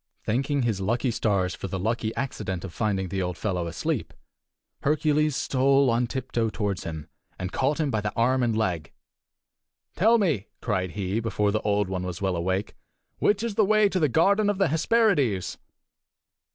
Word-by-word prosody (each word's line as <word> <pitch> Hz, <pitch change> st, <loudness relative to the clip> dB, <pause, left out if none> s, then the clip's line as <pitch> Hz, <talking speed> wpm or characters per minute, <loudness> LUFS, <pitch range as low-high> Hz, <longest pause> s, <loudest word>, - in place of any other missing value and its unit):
Thanking 135 Hz, +4 st, 0 dB
his 110 Hz, -5 st, 0 dB, 0.3 s
stars 95 Hz, -5 st, +1 dB
for -, -, -5 dB
the 95 Hz, -, -3 dB
lucky 110 Hz, +3 st, -1 dB
accident 100 Hz, -9 st, -3 dB
of 90 Hz, -, -8 dB
finding 95 Hz, -4 st, -1 dB
the 95 Hz, +2 st, -2 dB
old 90 Hz, -1 st, -3 dB
fellow 90 Hz, -5 st, -2 dB
asleep, 85 Hz, -, -3 dB, 0.7 s
Hercules 150 Hz, 0 st, +2 dB
stole 135 Hz, 0 st, +3 dB
on 120 Hz, +1 st, +1 dB
tiptoe 120 Hz, -2 st, -2 dB
toward 105 Hz, -3 st, -2 dB
him, 80 Hz, -2 st, -6 dB, 0.3 s
and 90 Hz, 0 st, -4 dB
caught 140 Hz, +4 st, 0 dB
him 150 Hz, -3 st, 0 dB
by 110 Hz, -, 0 dB
the 105 Hz, 0 st, -2 dB
arm 130 Hz, +3 st, +2 dB
and 115 Hz, -3 st, +1 dB
leg. 90 Hz, -9 st, -1 dB, 1.0 s
"Tell 225 Hz, +5 st, +5 dB
me," 155 Hz, -, 0 dB
cried 95 Hz, -6 st, -2 dB
he, 100 Hz, +1 st, -1 dB
before 105 Hz, -2 st, 0 dB
the 110 Hz, -, 0 dB
Old 105 Hz, -1 st, +1 dB
One 95 Hz, -1 st, -3 dB
was 90 Hz, -1 st, -5 dB
well 95 Hz, -2 st, 0 dB
awake, 95 Hz, +4 st, -1 dB, 0.5 s
"which 205 Hz, +1 st, +2 dB
is 230 Hz, -2 st, -2 dB
the 215 Hz, -, +3 dB
way 215 Hz, +1 st, +4 dB
to 190 Hz, -, 0 dB
the 155 Hz, -4 st, +3 dB
garden 200 Hz, -, +3 dB
of 205 Hz, -, 0 dB
the 195 Hz, -4 st, +2 dB
Hesperides?" 160 Hz, -, +2 dB
115 Hz, 175 wpm, -26 LUFS, 95-145 Hz, 1.0 s, Tell